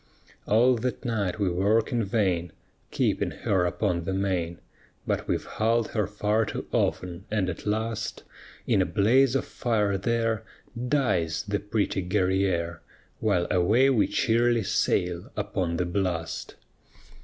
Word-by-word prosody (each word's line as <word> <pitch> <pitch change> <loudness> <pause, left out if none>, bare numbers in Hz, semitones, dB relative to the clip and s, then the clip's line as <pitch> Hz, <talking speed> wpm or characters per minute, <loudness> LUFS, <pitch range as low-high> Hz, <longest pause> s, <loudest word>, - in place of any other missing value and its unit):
_ - - -9
All 120 +3 +5
that 125 +3 -3
night 105 -6 -1
we 100 -2 0
work 100 +7 +2
in 120 -2 +1
vain 95 -5 0 0.4
Keeping - - 0 0.2
her 95 -3 +2
upon 85 0 -1
the 95 +2 -2
main, 90 -4 -1 0.5
But - - -1
we've - - -1
hulled 115 +1 0
her 105 -4 -1
far 105 +2 +1
too 105 - -4
often, 90 +1 -1
and 100 -3 0
at 85 - -9
last 110 +1 -2 0.4
In 95 - +3
a - - +2
blaze 120 +6 +3
of 135 - +1
fire 105 -5 0
there 115 +1 0 0.4
Dies 95 - +1
the 105 0 0
pretty 105 -1 -1
Guerrière; 90 -3 0 0.4
While 85 -1 +1
away 110 +10 +4
we 115 -6 +3
cheerly 120 -1 +2
sail 90 +3 0
upon 95 -5 -1
the 90 - 0
blast. 85 -3 -2
100 Hz, 145 wpm, -26 LUFS, 90-115 Hz, 0.5 s, All